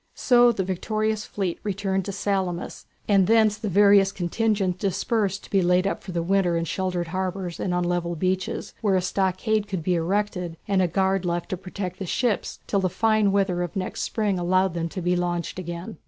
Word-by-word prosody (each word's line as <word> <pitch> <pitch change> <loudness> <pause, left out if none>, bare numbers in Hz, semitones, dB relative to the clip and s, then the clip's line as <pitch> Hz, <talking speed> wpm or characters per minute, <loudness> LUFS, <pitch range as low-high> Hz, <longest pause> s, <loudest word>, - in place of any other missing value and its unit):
So 245 -1 +5
the 200 -4 -2
victorious 215 +3 -1
fleet 190 -4 -3
returned 195 -2 -1
to 200 - -3
Salamis, 190 -3 -2 0.2
and 195 -3 +4
thence 220 -2 +4
the 215 -1 -3
various 200 0 +5
contingents 195 0 0
dispersed 200 0 -1
to - - -13
be 195 - +3
laid 180 +1 +3
up 195 - -1
for 190 - -7
the 170 -1 -1
winter 180 -1 +2
in 165 - -1
sheltered 180 0 -2
harbours 185 -1 -3
and 185 - -1
on 180 0 +1
level 175 -1 -1
beaches, 185 +2 -2
where 205 -4 +2
a 185 - +2
stockade 195 +3 0
could 190 -5 -4
be 180 - +1
erected 180 -1 -1
and 195 -2 +2
a 180 - +3
guard 190 +2 +1
left 175 -1 -2
to - - -1
protect 185 0 -6
the 190 - -4
ships 235 +3 -1
till 200 - 0
the 185 -1 +1
fine 215 +2 +2
weather 190 -3 +1
of 175 - -4
next 185 -1 -3
spring 205 -4 -1
allowed 185 +1 +2
them 170 -1 -2
to 185 +1 -6
be 180 +1 +2
launched 175 0 -2
again. 170 -2 -6
190 Hz, 200 wpm, -24 LUFS, 175-200 Hz, 0.2 s, So